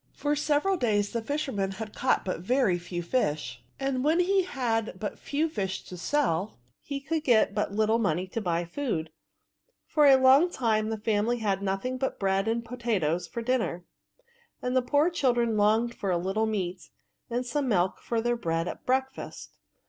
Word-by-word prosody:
For 295 0 -1
several 300 +6 +1
days 205 -6 +1
the 230 - -2
fisherman 220 -7 -2
had 215 +1 -7
caught 255 - +1
but 185 -3 -2
very 200 -2 +2
few 175 0 -5
fish; 155 - -1 0.2
and 270 -1 -1
when 315 +4 +3
he 380 +2 +3
had 235 -10 -2
but 210 - -4
few 300 +3 -1
fish 195 - -3
to - - -12
sell^ 195 - 0 0.3
he 280 -1 -4
could 310 +3 -2
get 230 -7 +4
but 205 -1 -1
little 220 +2 +2
money 180 -4 0
to 225 - -3
buy 175 -3 0
food. 170 - -3 0.7
For 300 -2 +4
a 270 - +8
long 265 +6 +6
time 220 -7 0
the 220 - -2
family 215 +2 0
had 205 -4 0
had - - -15
nothing 200 +7 -2
but 265 - -2
bread 195 +1 +1
and 230 +1 -1
po 250 +2 -7
tatoes 180 -8 0
for 235 - -5
dinner, 225 -8 -1 0.7
and 250 +1 -2
the 255 - +5
poor 290 +7 +2
children 240 -8 +1
longed 220 +3 +3
for 200 - -4
a 180 - +2
little 195 +5 0
meat, 185 -4 -3 0.4
and 245 +1 -2
some 275 +3 -1
milk 185 -5 +1
with 230 -1 +1
their 240 0 +1
bread 165 -6 -1
at - - -7
breakfast. 265 +1 -2
225 Hz, 185 wpm, -28 LUFS, 195-265 Hz, 0.7 s, a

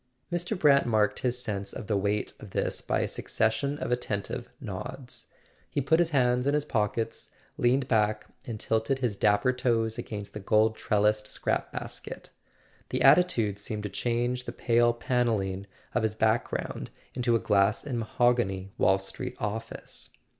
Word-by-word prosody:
Mr. 175 +4 -1
Brant 140 -6 +5
marked 110 -2 +2
his 125 -1 0
sense 100 -3 -3
of - - -6
the 105 - 0
weight 100 +1 0
of 105 - -10
this - - -1
by - - 0
a - - 0
succession 140 +6 0
of 125 - -3
attentive 110 -5 -2
nods. 130 -2 -7 0.4
He - - -1
put 160 +4 +3
his 170 -2 +3
hands 125 -3 +2
in 145 - +3
his 150 -1 0
pockets, 110 -3 -1 0.3
leaned 130 +2 +2
back, 110 -2 +2 0.2
and 115 -3 -6
tilted 115 +6 +1
his 125 -6 -1
dapper 105 +5 +3
toes 115 -3 0
against 105 -2 -6
the 105 - -5
gold 110 +2 +3
trellised 105 0 +1
scrap - - -1
basket. - - -7 0.6
The - - 0
attitude 115 - +4
seemed 105 0 -4
to 105 - -3
change 120 +3 -1
the - - -4
pale 120 0 +3
panelling 110 -6 0 0.3
of - - +2
his 110 -1 0
background 110 +2 0 0.2
into 120 -2 +1
a - - +3
glass 100 +1 +2
and 130 -5 -3
mahogany 110 -5 +1
Wall 95 - +5
Street 95 0 -5
office. 105 +2 -5
115 Hz, 160 wpm, -28 LUFS, 105-125 Hz, 0.6 s, Brant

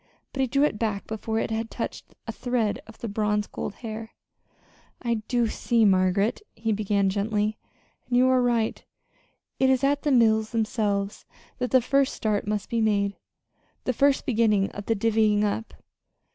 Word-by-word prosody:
But 270 - -1
he 265 - +2
drew 275 +4 +2
it 295 -8 +1
back 210 -3 -1
before 220 0 -3
it 225 - -1
had 225 0 -2
touched - - -6
a - - -4
thread 245 -4 -1
of 225 - -13
the 235 - -5
bronze 210 0 0
gold 205 - -6
hair. 220 0 -6 0.8
"I 235 -2 -1
do 240 -1 +2
see, 230 0 +1
Margaret," 190 - +2
he 225 0 -2
began 205 -1 +1
gently, 210 +1 -1 0.5
"and 245 - +1
you 255 +1 +5
are 260 -1 +4
right. 235 -2 0 0.8
It 265 - +4
is 265 0 +2
at 285 +1 +2
the 295 - 0
mills 220 -3 +4
themselves 210 -3 -1 0.3
that 250 -1 -1
the 260 - +5
first 275 +2 +1
start 210 -2 -1
must 210 -1 -2
be 230 -1 -1
made 200 -2 +1 0.7
the 255 - 0
first 280 +3 +2
beginning 215 -5 +2
of 205 - -8
the 225 - +2
'divvying 215 -1 +2
up.' 210 +2 -2
220 Hz, 170 wpm, -26 LUFS, 210-245 Hz, 0.8 s, you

